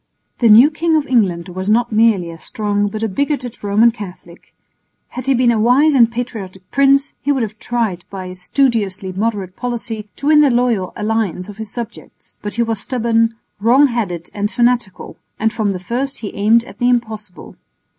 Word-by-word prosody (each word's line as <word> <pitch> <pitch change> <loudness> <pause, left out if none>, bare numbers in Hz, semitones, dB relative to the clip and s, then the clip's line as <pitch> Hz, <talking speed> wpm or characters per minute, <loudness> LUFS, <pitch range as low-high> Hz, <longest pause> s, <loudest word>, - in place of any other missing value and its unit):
The 235 - +4
new 235 +8 +8
King 325 +1 0
of 305 -2 +1
England 190 -9 +1
was 185 +2 -4
not 235 +2 +2
merely 215 -6 +2
a 165 - -11
strong 205 +1 -1
but 215 +2 -5
a - - +1
bigoted 250 +2 -3
Roman 210 +3 +4
Catholic. 185 -5 -11 0.6
Had 255 +1 -6
he 270 - +3
been 245 -1 +3
a 225 - +1
wise 260 +7 +4
and 235 -4 +5
patriotic 200 -6 -6
prince, 275 0 +3
he 285 - 0
would 265 -4 +1
have 215 -1 -6
tried 220 -8 -2
by 190 -2 -7
a 180 0 -8
studiously 195 -2 0
moderate 195 -2 -3
policy 230 -3 -5
to 280 - -8
win 300 0 +6
the 290 - +5
loyal 240 -6 +1
allegiance 210 -4 -2
of 205 - -10
his 220 -1 -6
subjects, 235 -2 -9
but 205 - -4
he 235 - +2
was 225 -2 -2
stubborn, 230 -1 0 0.2
wrong 245 +7 +5
headed 185 -8 -3
and 205 0 -1
fanatical, 240 -4 -1 0.2
and 220 +1 0
from 215 -3 -1
the 195 - -2
first 250 +9 -3
he 210 - -6
aimed 220 +3 +3
at 210 -3 -14
the 245 - +2
impossible. 220 -6 -3
225 Hz, 190 wpm, -17 LUFS, 200-245 Hz, 0.6 s, new